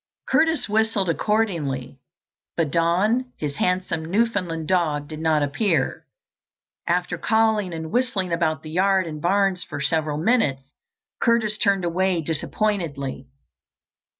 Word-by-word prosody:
Curtis 320 -1 +2
whistled 215 -3 +1
accordingly, 165 - -1 0.6
but 160 -4 0
Don, 200 - +1
his 145 -2 -4
handsome 180 -3 0
Newfoundland 180 -4 -1
dog, 155 -6 +1
did 155 0 -7
not 155 -2 +2
appear. 150 0 0 0.8
After 175 0 0
calling 220 -3 +2
and 160 -1 -6
whistling 215 -8 0
about 160 -3 0
the 155 - -8
yard 190 +2 +2
and 155 -2 -6
barns 195 +1 +1
for 145 - -7
several 150 +1 0
minutes, 155 - +1 0.6
Curtis 230 -3 +2
turned 195 -3 +2
away 180 +1 +1
disappointedly. 155 - -2
175 Hz, 120 wpm, -23 LUFS, 155-210 Hz, 0.8 s, Curtis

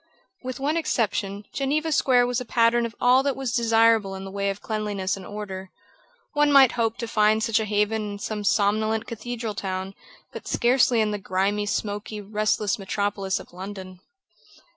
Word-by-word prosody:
With 255 0 -6
one 295 +4 0
exception, 205 - -1
Geneva 300 +4 0
Square 250 -4 +4
was 245 0 -1
a - - -3
pattern 235 0 +2
of 230 - -14
all 250 +2 +5
that 275 -1 -1
was 265 -3 -3
desirable 225 -3 +3
in 190 - -7
the 195 - -8
way 200 0 -1
of 195 0 -4
cleanliness 205 -4 -2
and 195 - -10
order. 195 -3 -7 0.6
One 295 -1 +3
might 270 -3 +7
hope 230 -2 -1
to 235 - -4
find 215 0 +2
such 225 -1 +2
a 220 - -1
haven 210 0 0
in - - -6
some 210 +1 -4
somnolent 215 +2 +1
cathedral 230 0 -5
town, 190 -1 -4 0.4
but - - -8
scarcely 240 -1 +3
in 215 -1 +1
the 210 - -3
grimy, 200 +2 -1
smoky, 210 0 -3
restless 210 0 -1
metropolis 195 0 -2
of - - -14
London. 185 0 -8
215 Hz, 175 wpm, -24 LUFS, 200-235 Hz, 0.6 s, might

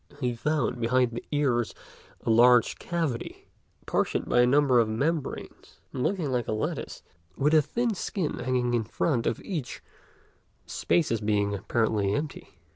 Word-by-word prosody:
He 125 -3 0
found 130 0 -1
behind 125 +1 +2
the 120 - -6
ears 130 -6 +1 0.5
a - - 0
large 120 +1 +5
cavity, 165 -9 -3 0.4
partitioned - - 0
by 120 - +4
a 125 - +4
number 135 -2 +4
of 115 -2 +2
membranes, 145 +7 -3
and 130 - -3
looking 170 -3 0
like 125 -2 -1
a - - -1
lattice, 110 - -4 0.3
with 150 +3 +2
a 155 - +7
thin 235 - -1
skin 190 -3 -3
hanging 125 -1 0
down 120 -1 +2
in - - -4
front 120 +2 -1
of - - -1
each, 160 -11 -5 0.8
the - - -13
spaces 130 -10 +1
being 105 -1 +1
apparently 105 0 0
empty. 145 -10 -5
125 Hz, 160 wpm, -27 LUFS, 115-150 Hz, 0.8 s, a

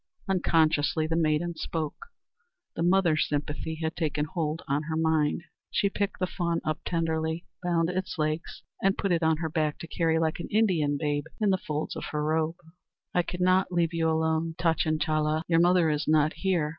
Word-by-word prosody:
unconsciously 160 -4 +2
the 160 +1 -1
maiden 165 +1 +1
spoke. 160 - -4 0.7
The - - -3
mother 175 -2 +4
sympathy 150 +1 -2
had 160 0 -1
taken 150 -3 -1
hold 160 0 -3
on 140 +2 +1
her 160 +1 -3
mind. 160 -1 +1 0.3
She 200 - +1
picked 200 -1 -2
the 185 - 0
fawn 170 -2 -1
up 155 -1 -1
tenderly, 160 0 -1 0.2
bound 170 -2 +1
its 185 0 -3
legs, 155 +1 -2 0.2
and 195 +1 +2
put 195 - 0
it 170 -1 +2
on 160 -1 +3
her 160 0 -2
back 155 -1 0
to 165 - -8
carry 160 -1 +1
like 160 0 0
an - - -5
Indian 175 -10 +2
babe 145 -1 -1
in 210 -2 +3
the 190 - +1
folds 150 -2 -3
of - - -5
her 150 -1 -2
robe. 160 +1 0 0.6
"I 180 - +4
cannot 185 +2 +1
leave 170 -1 +1
you 165 -1 +1
alone, 160 0 0
Tachinchala. 155 -1 +1
Your 165 -1 +3
mother 175 -1 +4
is 150 0 -1
not 155 0 +3
here. 180 -6 0
160 Hz, 180 wpm, -28 LUFS, 155-175 Hz, 0.7 s, mother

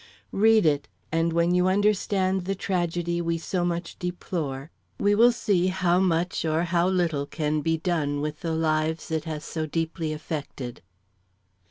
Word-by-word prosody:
Read 220 0 +5
it, 145 -2 +2 0.2
and 165 +1 +1
when 170 +1 +2
you 180 0 +3
understand 190 -1 +1
the 195 +1 -1
tragedy 175 -2 -1
we 165 0 0
so 175 +2 -2
much 175 -1 -3
deplore, 165 -5 -4 0.3
we 205 0 +3
will 235 +4 +6
see 200 -6 +1
how 185 -1 +2
much 175 -2 +1
or 160 +1 +1
how 175 0 +2
little 170 -6 0
can 150 -1 -1
be 165 +1 +1
done 155 -4 -1
with 150 0 -3
the 165 -1 -2
lives 160 0 0
it 160 0 -1
has 155 -2 -5
so 160 -1 -3
deeply 165 0 -2
affected." 145 -5 -5
170 Hz, 160 wpm, -26 LUFS, 155-185 Hz, 0.3 s, will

